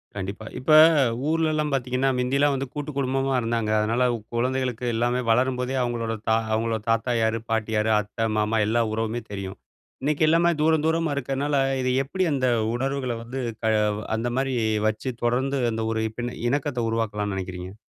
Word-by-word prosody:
கண்டிப்பா. 100 +2 -5
இப்ப 130 +5 -1 0.6
ஊர்லலாம் 155 -2 +1
பாத்தீங்கன்னா, 130 +1 0
மிந்தில்லா 140 +3 +2
வந்து 135 0 -2
கூட்டு 150 0 -4
குடும்பமா 135 0 0
இருந்தாங்க. 115 -1 -1
அதுனால 115 +4 +1 0.3
குழந்தைகளுக்கு 125 0 -1
எல்லாமே 120 +2 +1
வளரும்போதே 125 +2 +1
அவங்களோட 115 -2 -2 0.2
தா 110 - +5 0.2
அவங்களோட 110 0 0
தாத்தா 115 +2 +1
யாரு, 110 0 +1
பாட்டி 110 -1 0
யாரு, 110 +1 +2
அத்தை, 105 +2 -3
மாமா 105 +1 +1
எல்லா 115 +2 +2
உறவுமே 115 +2 -2
தெரியும். 95 -1 -6 0.5
இன்னைக்கு 150 +2 +1
எல்லாமே 170 +2 +4
தூரந்தூரமா 160 0 +2
இருக்கறதுனால, 140 +2 -1 0.3
இது 130 0 0
எப்படி 185 +8 -2
அந்த 130 -2 +1 0.3
உணர்வுகள 135 0 -2
வந்து 130 +3 -5 0.2
க - - -1 0.5
அந்த 115 +2 -1
மாதிரி 135 -1 0 0.3
வச்சு 110 +4 -2
தொடர்ந்து 130 +4 +1
அந்த 110 0 -2
ஒரு 110 0 -1
பி 120 - -3 0.3
இணக்கத்த 140 -2 -1
உருவாக்கலாம்னு 105 -3 -2
நினைக்கிறீங்க? 95 0 -6
125 Hz, 150 wpm, -24 LUFS, 110-135 Hz, 0.6 s, தா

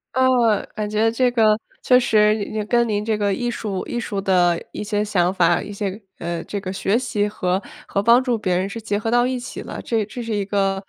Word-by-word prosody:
啊， 260 0 +4 0.5
感 210 -1 -3
觉 215 +2 +2
这 250 +2 +2
个 220 -3 +3 0.2
确 250 -1 +5
实 215 -2 +2
跟 235 -1 +3
您 210 -1 -1
这 215 0 0
个 205 -1 +1
艺 240 +4 -2
术 205 -5 -4
艺 240 - -3
术 200 -4 -3
的 180 -3 +3
一 - - -6
些 210 0 -1
想 180 -4 +1
法， 175 -3 +3
一 205 - -7
些， 200 +1 -4 0.2
呃， 170 0 -3
这 205 - -4
个 185 -1 -4
学 195 +3 0
习 210 -5 -1
和 185 -2 -1 0.2
和 200 - -1
帮 235 +4 +5
助 245 -3 0
别 185 -4 0
人 185 +1 0
是 230 - -6
结 210 -2 -1
合 225 +2 -2
到 240 +1 +3
一 255 0 -1
起 245 - -7
了， - - -7
这 225 -3 -1
这 240 +4 -7
是 230 -1 -3
一 205 -1 -1
个， 195 -1 +1
210 Hz, 250 characters per minute, -21 LUFS, 195-230 Hz, 0.5 s, 确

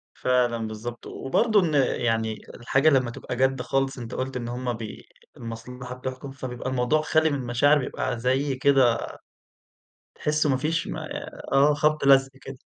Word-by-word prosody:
فعلًا 120 -3 +1
بالضبط. 115 +2 -7
وبرضه 215 - +1
إن 165 -5 0 0.3
يعني 110 -2 0
الحاجة 135 +5 +2
لمّا 130 -4 +2
تبقى 125 - -6
جَد 130 +1 +1
خالص، 135 +2 -1
أنت 120 -1 -7
قُلت 130 0 -3
إن 120 -1 -5
هم 125 0 -3
بي 110 -2 -8 0.3
المصلحة 125 +2 -7
بتحكُم، 130 +1 -6
فبيبقى 130 -1 -5
الموضوع 130 +4 +1
خالي 155 0 +2
من 145 - -1
المشاعر 130 +4 +3
بيبقى 125 -2 -3
زي 130 +3 0
كده 130 -3 +4 1.2
تحسّوا 150 0 0
ما 130 - +2
فيش 155 +5 -1
ما - - -5 0.4
آه. 140 +2 +5
خَبْط 150 0 +1
لَزْق 135 -1 +6
كده. 135 -1 -9
130 Hz, 155 wpm, -25 LUFS, 120-140 Hz, 1.2 s, لَزْق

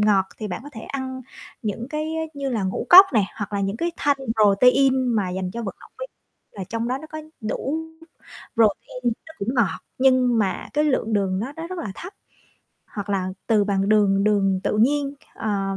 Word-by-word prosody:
ngọt 205 -2 +4
thì 215 - -4
bạn 180 - -4
có 290 - -10
thể 220 - -8
ăn 260 +1 -5 0.4
những 220 +2 -3
cái, 305 0 -2
ơ, 320 - -1
như 280 -1 -3
là 225 -6 -1
ngũ 190 0 -2
cốc 380 +2 +11
nè, 215 -4 +3
hoặc 205 -2 -5
là 200 - -1
những 195 +2 -1
cái 340 +5 -1
thanh 285 -1 +1 0.2
protein 255 +6 +4
mà 200 -4 0
dành 185 0 -3
cho 235 +4 -5
vận 195 - -5
động - - -16
viên - - -5 0.4
là 195 - -6
trong 230 +5 -3
đó 260 +2 -1
nó 315 - -10
có 310 - -6 0.2
đủ 270 +8 -2 0.8
protein, 230 +3 +1 0.2
nó 320 - -12
cũng 200 +3 -4
ngọt 235 -5 +1 0.2
nhưng 255 -3 +4
mà 195 -3 -1
cái 300 +1 +2
lượng 255 -6 0
đường 190 -2 +1
nó 250 +7 -4
nó 325 +1 -5
rất 370 0 -6
là 210 -12 -4
thấp, 360 - -9 0.7
hoặc 205 -1 -6
là 190 -2 0 0.2
từ 215 -3 +3
bằng 195 -1 0
đường 200 -2 +3
đường 195 -3 +2
tự 210 - 0
nhiên, 280 +4 +2 0.2
ờ, 195 -3 -2
220 Hz, 210 wpm, -23 LUFS, 200-270 Hz, 0.8 s, cốc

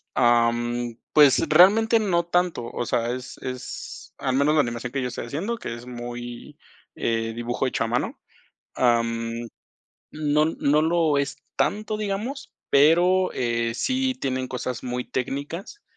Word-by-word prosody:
Ah, 120 -1 +4
mm, 120 0 -3 0.2
pues 145 -3 +7
realmente 220 +5 +6
no 180 -5 +1
tanto, 175 -6 0
o 120 - -4
sea, 115 +1 0
es 125 0 -6
es 130 0 -7
al 130 -2 -1
menos 145 +3 +3
la - - +4
animación 120 -1 -4
que 135 0 -2
yo 125 - -1
estoy 125 - -5
haciendo, 170 - -3
que 170 - -5
es 120 +1 -9
muy, 120 -1 -8 0.4
eh, 115 -1 -1
dibujo 120 +3 -2
hecho 125 -3 0
a - - -3
mano. 120 +2 -2 0.6
Ah, 120 -2 +3
mm, 115 0 -4 0.6
no 150 0 +1
no 150 -1 +2
lo 160 -3 +2
es 140 0 -2 0.2
tanto, 215 +1 0
digamos, 215 +6 -4 0.2
pero, 175 +6 +4
eh, 115 -1 -1
sí 260 - 0
tienen 130 -1 -2
cosas 125 -1 -4
muy 125 0 -3
técnicas 145 - -5
130 Hz, 155 wpm, -24 LUFS, 120-170 Hz, 0.6 s, pues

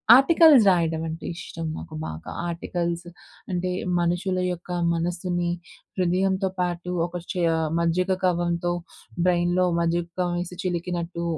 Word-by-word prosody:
Articles 295 -1 +7
రాయడం 165 -3 +2
అంటే 160 +1 -6
ఇష్టం 165 -2 -6
నాకు 155 - -8
బాగా. 80 +1 -7 0.2
ఆర్టికల్స్ 170 0 -3 0.5
అంటే 180 0 -1 0.3
మనుషుల 175 +2 0
యొక్క 175 +1 -9 0.2
మనస్సుని 175 +1 -1 0.5
హృదయంతో 190 +2 +1
పాటు 175 0 -2 0.2
ఒక 175 +1 -8 0.2
చే 180 -2 -1 0.4
మజ్జిగ 180 +3 +1
కవ్వంతో 175 -1 +1 0.6
బ్రెయిన్‌‌‌లో 175 +1 +3
మజ్జిగ 170 0 +1
కవ్వం 175 -1 0
వేసి 180 0 -7
చిలికినట్టు 175 -1 -3
175 Hz, 115 wpm, -25 LUFS, 170-180 Hz, 0.6 s, ఆర్టికల్స్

